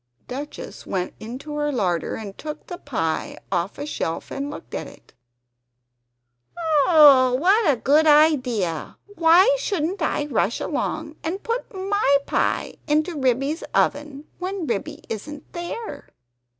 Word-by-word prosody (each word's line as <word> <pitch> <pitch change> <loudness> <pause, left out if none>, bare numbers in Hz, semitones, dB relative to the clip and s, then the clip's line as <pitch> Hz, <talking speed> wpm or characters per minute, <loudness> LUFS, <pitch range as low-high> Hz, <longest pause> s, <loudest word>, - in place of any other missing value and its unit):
Duchess 280 +4 -7
went 185 -1 -2
into 255 +7 -7
her 295 0 0
larder 185 - -1
and 205 -3 -7
took 305 -1 -7
the 355 -1 -7
pie 165 - -2
off 175 +4 -1
a 290 - -4
shelf 165 - -4
and 280 +1 -3
looked 295 - -10
at - - -4
it. - - -17 1.7
"Oh 280 -6 +7
what 390 +3 +4
a - - +1
good 295 +6 +3
idea! 255 - +3
Why 375 +3 +5
shouldn't 370 -3 -2
I 300 -1 0
rush 235 -6 0
along 310 0 -3
and 360 +5 -3
put 465 +2 -3
my 385 -7 +2
pie - - -1
into 310 +3 +1
Ribby's 275 +4 0
oven 290 0 0
when 370 -1 -3
Ribby 215 -8 -3
isn't 285 +7 -7
there?" 345 -2 -6
295 Hz, 135 wpm, -23 LUFS, 255-335 Hz, 1.7 s, Oh